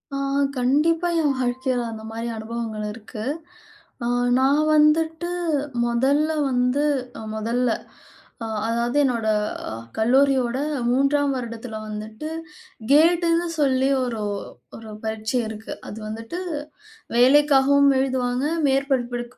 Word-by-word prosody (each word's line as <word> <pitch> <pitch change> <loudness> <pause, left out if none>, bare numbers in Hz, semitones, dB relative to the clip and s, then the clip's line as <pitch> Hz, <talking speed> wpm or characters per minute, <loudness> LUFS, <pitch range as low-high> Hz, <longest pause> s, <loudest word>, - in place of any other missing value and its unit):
ஆ - - -1 0.4
கண்டிப்பா, 310 +7 +2
என் 290 -2 +2
வாழ்க்கையில 255 0 0
அந்த 220 -1 -8
மாரி 230 +1 -4
அனுபவங்கள் 220 -1 -5
இருக்கு. 215 0 -8 0.8
அ - - 0 0.3
நான் 275 +3 +3
வந்துட்டு 320 +3 +3 0.6
மொதல்ல 275 +6 +2 0.2
வந்து 250 +3 +1 0.5
மொதல்ல 235 +3 0 0.7
அ - - -3 0.2
அதாவது, 235 +3 0
என்னோட 235 -4 0 0.7
கல்லூரியோட 255 +1 +3 0.3
3ஆம் 275 +3 +2
வருடத்துல 230 -2 -6
வந்துட்டு, 215 +7 -6 0.6
கேட்டுன்னு 335 +3 +4
சொல்லி 265 -2 +2
ஒரு 240 -3 -3 0.6
ஒரு 225 -1 -11 0.2
பரீட்சை 220 +3 -1
இருக்கு. 220 0 -7 0.2
அது 210 - -8
வந்துட்டு 225 +10 -6 0.8
வேலைக்காகவும் 280 +1 +5
எழுதுவாங்க, 255 -1 0 0.2
மேற்படிப்பு 265 -3 0
255 Hz, 100 wpm, -23 LUFS, 230-280 Hz, 0.8 s, வேலைக்காகவும்